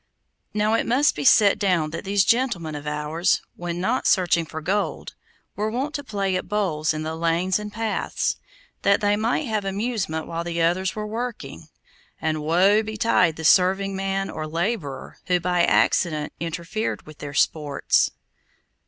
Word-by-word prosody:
Now 210 +1 +1
it 225 - +1
must 265 +5 +3
be 150 - -4
set 200 +7 +5
down 180 -6 +1
that 165 - -5
these 195 0 +2
gentlemen 230 -11 +1
of 150 0 -7
ours, 150 +3 0
when 175 0 -4
not 225 +8 0
searching 175 -3 +2
for 160 - -6
gold, 195 +6 -2 0.4
were 210 +1 -1
wont 265 +6 -3
to 285 - -4
play 200 -6 -1
at 185 - -3
bowls 180 -8 0
in 155 0 -3
the 160 +1 -3
lanes 170 +4 +1
and 210 0 -6
paths, 225 0 -2 0.4
that 200 0 +3
they 205 0 +2
might 230 +8 0
have 215 -4 -1
amusement 195 -5 -2
while 170 0 -4
the 170 0 -3
others 180 +3 +1
were 215 0 -4
working, 235 +3 -6 0.5
and 155 -1 -1
woe 185 +7 +4
betide 215 -6 +1
the 160 - -6
serving 190 +3 +4
man 195 0 -2
or 155 0 -5
laborer, 165 - -3
who 180 -1 +2
by 180 0 +1
accident 155 -4 +2
interfered 170 +6 -3
with 155 -1 -13
their 145 0 -7
sports. 150 -1 +2
185 Hz, 165 wpm, -23 LUFS, 160-210 Hz, 0.5 s, set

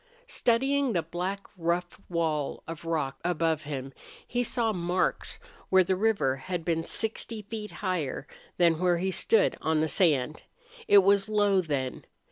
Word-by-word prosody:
Studying 270 - +1
the 170 -3 +1
black, 180 +5 -3
rough 175 +2 -2
wall 160 -4 -1
of 165 0 -7
rock 155 -5 -2
above 165 -2 +1
him, 135 -2 -5 0.3
he 245 0 0
saw 230 -2 +1
marks 180 0 0 0.3
where 190 0 +6
the 185 +1 +1
river 200 -10 +1
had 170 +4 -4
been 165 -1 0
sixty 220 +2 -3
feet 210 0 -6 0.2
higher 165 -7 -2 0.3
than 170 -2 +4
where 180 -1 +3
he 190 +2 -1
stood 215 +3 +3
on 160 -1 +1
the 160 - +2
sand. 155 -4 +1 0.5
It 200 -1 +7
was 200 +1 +3
low, 205 -3 +3
then. 140 -6 -3
180 Hz, 150 wpm, -28 LUFS, 160-205 Hz, 0.5 s, It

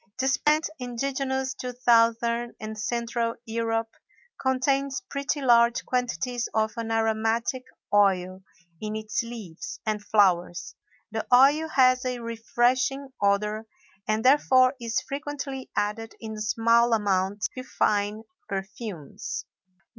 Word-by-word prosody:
This 265 0 +2
plant, 305 +2 +2
indigenous 265 +2 -2
to 250 -1 -5
Southern 235 0 +3
and 215 0 -6
Central 230 +1 -2
Europe, 225 0 -1 0.5
contains 270 +1 +1
pretty 280 +1 -2
large 235 -1 +4
quantities 245 0 -1
of 220 0 +1
an 230 -1 -4
aromatic 225 +3 0 0.3
oil 190 -2 +3 0.4
in 215 0 -3
its 215 +1 -2
leaves 230 -2 -8
and 215 -1 -1
flowers; 185 -4 +2 0.4
the 220 0 -3
oil 280 +6 +6
has 255 -3 +4
a 250 -1 -2
refreshing 245 +4 0
odor 210 +2 +1 0.4
and 215 +2 0
therefore 260 -1 +5
is 230 -1 0
frequently 280 -2 -5
added 215 +2 -2
in 220 -1 -6
small 230 +2 +3
amounts 200 -1 +1
to 255 - -4
fine 210 -3 0 0.3
perfumes. 195 - -5
230 Hz, 115 wpm, -26 LUFS, 215-255 Hz, 0.5 s, oil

